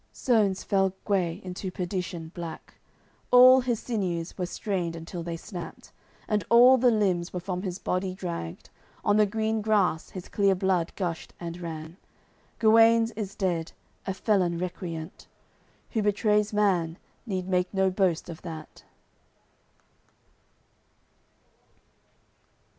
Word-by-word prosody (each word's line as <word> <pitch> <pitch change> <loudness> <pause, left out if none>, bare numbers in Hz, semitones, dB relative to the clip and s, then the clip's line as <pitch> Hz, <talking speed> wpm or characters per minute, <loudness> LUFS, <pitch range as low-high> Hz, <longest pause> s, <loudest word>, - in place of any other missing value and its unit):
Sones 215 -7 +1
fell 195 -2 +1
Gue 185 -4 0
into 185 +1 -5
perdition 180 -3 -4
black; 170 -3 -8 0.6
All 255 +1 +8
his 240 -3 -1
sinews 180 -7 -3
were 180 -2 -3
strained 180 -3 -3
until 165 +1 -7
they 170 0 -4
snapped, 175 -1 -9 0.4
And 210 -3 0
all 250 +3 +7
the 250 +1 +5
limbs 190 -6 +1
were 180 - -3
from 180 0 -4
his 185 -2 -4
body 185 -1 -2
dragged. 170 - -6 0.3
On 205 0 +4
the 210 -1 +5
green 220 +1 -1
grass 205 -6 +1
his 185 -2 -8
clear 200 -2 +2
blood 185 -2 0
gushed 175 -4 -4
and 170 0 -6
ran. 160 0 -7 0.6
Guenes 225 +1 +5
is 205 -3 -6
dead, 170 -5 -1 0.3
a 190 - 0
felon 185 -5 +1
recreant. 170 -2 -6 0.6
Who 220 - 0
betrays 210 0 +2
man, 180 -6 +1 0.3
need 185 -3 -3
make 180 -1 0
no 190 -1 +2
boast 185 -4 +1
of 170 -1 -8
that. 160 -3 -9
185 Hz, 125 wpm, -27 LUFS, 175-210 Hz, 0.6 s, All